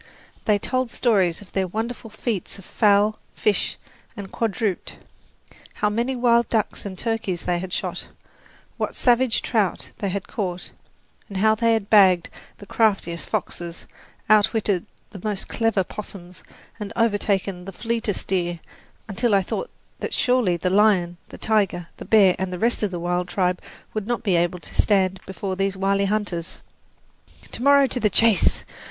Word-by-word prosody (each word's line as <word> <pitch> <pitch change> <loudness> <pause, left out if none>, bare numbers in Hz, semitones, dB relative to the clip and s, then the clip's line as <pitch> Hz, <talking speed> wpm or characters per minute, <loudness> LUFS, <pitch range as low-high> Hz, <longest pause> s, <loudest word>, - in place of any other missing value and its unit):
They 210 -1 +4
told 255 +4 -1
stories 200 -8 +1
of 190 - -20
their 190 -1 0
wonderful 225 +4 -4
feats 215 -2 -3
with 195 - -13
fowl, 210 0 +3 0.2
fish 205 -3 0 0.4
and 195 -2 -7
quadruped 215 -3 -2 0.8
how 210 - +1
many 240 +5 -1
wild 235 -1 +3
ducks 215 -2 -1
and 190 -2 -8
turkeys 220 -6 -2
they 175 -1 0
had 185 0 -6
shot, - - -3 0.7
what - - -3
"savage 245 -1 +3
trout" 215 -6 0
they 200 - -1
had 195 +1 -4
caught, 180 -4 -4 0.6
and 195 - -5
how 215 +3 +4
they 230 +1 +2
had 220 -3 -1
bagged 190 -5 +6 0.3
the 205 - -12
craftiest 195 -6 0
foxes, 175 -5 -4 0.4
outwitted 210 -3 +3 0.2
the 195 - -10
most 210 -3 -2
clever 225 -4 +1
'possums 180 -2 -9 0.4
and 210 -1 -5
overtaken 200 -5 0
the 195 - -6
fleetest 225 0 -2
deer, 175 -2 -1 0.5
until 215 +1 +1
I 195 - +3
thought - - -4 0.3
that - - -3
surely 245 -9 +2
the 180 +2 -1
lion, 190 -4 +3
the - - -10
tiger, 200 -6 0
the - - -8
bear 200 -4 +5
and 190 -1 -2
the 180 - -4
rest 230 +6 +1
of 210 - +1
the 180 -2 -5
wild 175 +1 -1
tribe 180 -1 0 0.3
would 215 -2 -3
not 240 -1 -1
be 195 -5 +2
able 175 +1 +1
to - - 0
stand 190 -2 +2
before 190 0 -4
these 195 0 -1
wily 195 +1 +1
hunters. 195 -5 -2 0.9
"To - - -6
morrow 280 +1 +6
to 255 - -2
the 215 - +2
chase!" 225 +1 +3
200 Hz, 160 wpm, -23 LUFS, 185-225 Hz, 0.9 s, bagged